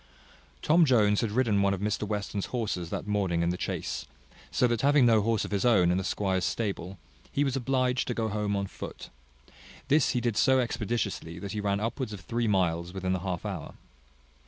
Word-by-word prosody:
Tom 165 +3 +5
Jones 105 -8 +4
had 115 - 0
ridden 110 -3 +2
one 100 0 +2
of - - -8
Mr 105 +1 -1
Western's 100 -1 -3
horses 105 -8 -3
that - - -4
morning 95 -5 0
in 85 - +1
the - - -2
chase; - - -4 0.4
so 85 - +2
that 120 -2 +1
having 140 -1 +5
no 115 -2 +5
horse 115 0 +1
of - - -8
his 100 -2 0
own 100 -8 +4
in 90 - +1
the - - -2
squire's 95 -1 -1
stable, 100 -2 -2 0.3
he 145 - +1
was 135 -2 0
obliged 130 -1 0
to 125 - -2
go 110 -1 0
home 105 -1 -1
on 100 0 -1
foot: - - -9 0.8
this 150 +3 +4
he 125 - +1
did 120 -2 -1
so 130 +3 +4
expeditiously 110 -8 -2
that 100 +2 -6
he 105 - -3
ran 100 -1 0
upwards 115 +1 -3
of 100 - -8
three 120 0 -1
miles 85 -3 0
within 95 -1 -1
the 95 - -1
half 90 -2 -4
hour. - - -5
105 Hz, 205 wpm, -28 LUFS, 95-120 Hz, 0.8 s, Tom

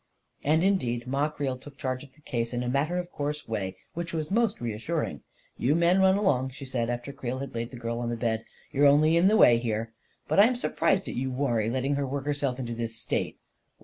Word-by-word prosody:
And 155 +4 +3
indeed 125 -12 +1
Ma 140 +4 0
Creel 135 -4 -3
took 140 +1 -13
charge 130 -1 -3
of 140 - -14
the 150 - -23
case 115 -4 -2
in 120 - -1
a - - -3
matter 140 +7 +1
of 180 0 -4
course 150 +1 -3
way 95 -4 -3 0.2
which 170 0 -5
was 155 +1 -3
most 225 0 +2
reassuring. 110 -2 -3 0.4
44 - - -9
You 145 - +4
men 170 +3 +4
run 190 0 +5
along," 135 -11 +2
she 135 +1 -9
said, 120 -3 -1
after 120 +3 -4
Creel 130 -2 -4
had 135 0 -6
laid 115 0 -3
the 125 - -9
girl 115 0 -3
on 120 -1 -2
the 120 - -1
bed. 115 -1 0 0.3
44 135 - -4
You're 145 -1 +8
only 155 +3 +4
in 170 +3 +5
the 215 +2 +5
way 120 - +7
here. 115 -1 -2 0.3
But - - +2
I'm 230 +5 +6
surprised 195 -5 +1
at - - -4
you, 130 +2 -2
Warrie, 120 -5 0
letting 130 +3 0
her 140 -1 -1
work 140 +1 -3
herself 145 -3 -1
into 120 -3 -4
this 115 -1 -4
state." 115 - -2
135 Hz, 240 wpm, -28 LUFS, 120-155 Hz, 0.4 s, You're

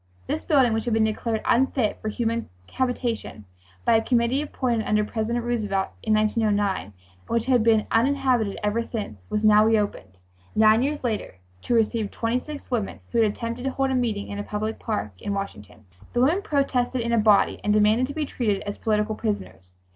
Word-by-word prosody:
This - - -3
building, 265 -6 +3
which 225 +1 -1
had 235 -2 +1
been 225 - +3
declared 220 0 -1
unfit 250 -2 +1
for 215 - -2
human 230 +1 -2 0.2
habitation 245 - -2 0.4
by 225 - +5
a - - +1
committee 245 +3 +2
appointed 245 -6 -1
under 210 0 +2
President 235 +2 -2
Roosevelt 210 -5 -1
in 220 -1 +2
1909, 210 -2 +1
and 100 - -16 0.3
which 230 -1 0
had 250 -3 +3
been 220 -2 +3
uninhabited 250 -3 +2
ever 210 +3 +1
since, 205 - -6
was 210 +1 0
now 210 0 +7
reopened, 205 - 0 0.4
nine 220 +1 +5
years 290 +2 -1
later, 220 - -2 0.3
to 240 - 0
receive 225 -2 +1
twenty 230 +2 -1
six 290 0 -9
women 220 -5 -2
who 235 - +1
had 215 -2 +3
attempted 230 +3 -5
to - - +1
hold 270 0 -1
a - - 0
meeting 230 -5 -1
in 205 - -5
a - - -3
public 215 +2 -3
park 210 - -3
in 205 - -2
Washington. 105 - -7 0.3
The 240 - +2
women 320 +10 +3
protested 265 - 0
in 235 0 -2
a 230 - +4
body 210 -2 +3
and 210 - +1
demanded 215 +4 +3
to 285 - -7
be 310 -1 -1
treated 215 -7 -1
as 205 - -6
political 215 -1 0
prisoners. 95 - -5
225 Hz, 190 wpm, -24 LUFS, 210-245 Hz, 0.4 s, now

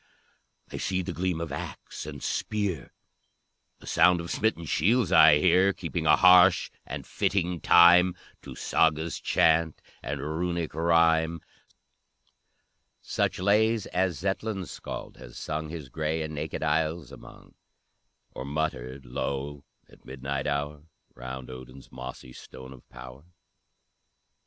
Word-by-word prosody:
I - - -5
see 95 0 -2
the 90 - -5
gleam 90 0 -2
of 85 -1 -5
axe - - -7
and - - -8
spear, 100 - -3 0.9
A - - -14
sound 90 -1 +4
of 85 0 -6
smitten 110 -6 -1
shields 105 - +1
I 75 - +7
hear, 90 +5 +3
Keeping 85 -3 -4
a 75 - +7
harsh 90 +3 +6 0.2
and - - -6
fitting 90 -3 -1
time 90 +1 +6 0.3
To - - -10
Saga's 80 0 0
chant, 80 -1 +2 0.2
and 70 +1 -4
Runic 85 +3 -3
rhyme; 85 0 +2 1.6
Such - - -2
lays 105 +3 +2
as 90 -3 -1
Zetland's 95 0 -3
Scald - - -8
has - - -12
sung, 75 0 -4
His 80 -3 -7
gray 80 +4 -2
and 80 0 -6
naked 75 +1 -4
isles 80 0 -1
among; - - -14 0.8
Or - - -7
muttered 70 -3 -4
low 70 +3 -4 0.2
at - - -21
midnight 70 +2 -4
hour 75 0 -3 0.3
Round 65 +1 -8
Odin's 65 +1 -12
mossy 65 0 -9
stone 65 +1 -12
of 65 - -18
power. 65 +2 -11
80 Hz, 130 wpm, -27 LUFS, 70-90 Hz, 1.6 s, I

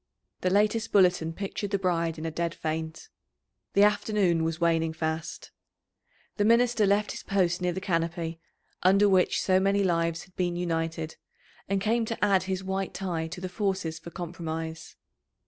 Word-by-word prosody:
The 185 - +1
latest 215 +4 +2
bulletin 180 -4 +4
pictured 200 +3 -4
the 200 - +1
bride 170 -3 0
in 155 - -6
a 165 - -2
dead 170 +1 -2
faint. 160 +1 -4 0.7
The 200 - +5
afternoon 205 -5 +2
was 165 0 -2
waning 165 -1 +2
fast. 160 0 -4 0.9
The 205 - +2
minister 230 -1 +4
left 205 +1 +2
his - - -6
post 180 -3 0
near 180 0 +1
the 180 - -3
canopy, 165 -2 -2 0.4
under 195 +3 +5
which 190 -2 +3
so 185 -1 +4
many 200 +1 +2
lives 165 -2 0
had 180 - -21
been 175 -1 -1
united, 165 -2 -2 0.5
and 195 0 +1
came 225 +3 +1
to 225 -2 -1
add 195 -2 +3
his 190 0 -2
white 190 0 -3
tie 175 -4 -2
to 175 +3 -7
the 185 - -4
forces 190 -3 -2
for - - -9
compromise. 165 -2 -6
180 Hz, 165 wpm, -28 LUFS, 165-200 Hz, 0.9 s, The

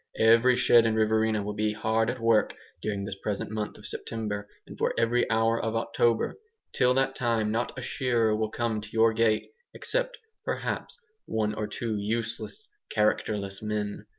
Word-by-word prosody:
Every 115 +3 +5
shed 115 -1 +5
in 110 - +1
Riverina 110 -1 +2
will 105 +1 -3
be 105 0 0
hard 110 +1 +1
at 125 +1 -3
work 115 -2 +3 0.3
during 100 -2 -2
this 100 - -4
present 105 0 -3
month 110 -1 -4
of - - -13
September 105 -2 -4 0.2
and - - -10
for - - 0
every 115 +1 +2
hour 115 0 +2
of 115 -1 -2
October. 115 - +1 0.3
Till 125 0 +3
that 135 0 +2
time 115 -4 0
not 115 +4 -2
a 130 - -5
shearer 120 -4 +1
will 110 0 -1
come 115 -2 -1
to 105 - -9
your 115 0 +4
gate, 110 -1 +1 0.2
except, - - -2 0.3
perhaps, - - -3 0.3
one 105 -1 0
or 105 - -3
two 110 0 -3
useless, 115 - -3 0.2
characterless 105 -2 0
men. 105 -1 -3
110 Hz, 170 wpm, -28 LUFS, 105-115 Hz, 0.3 s, Every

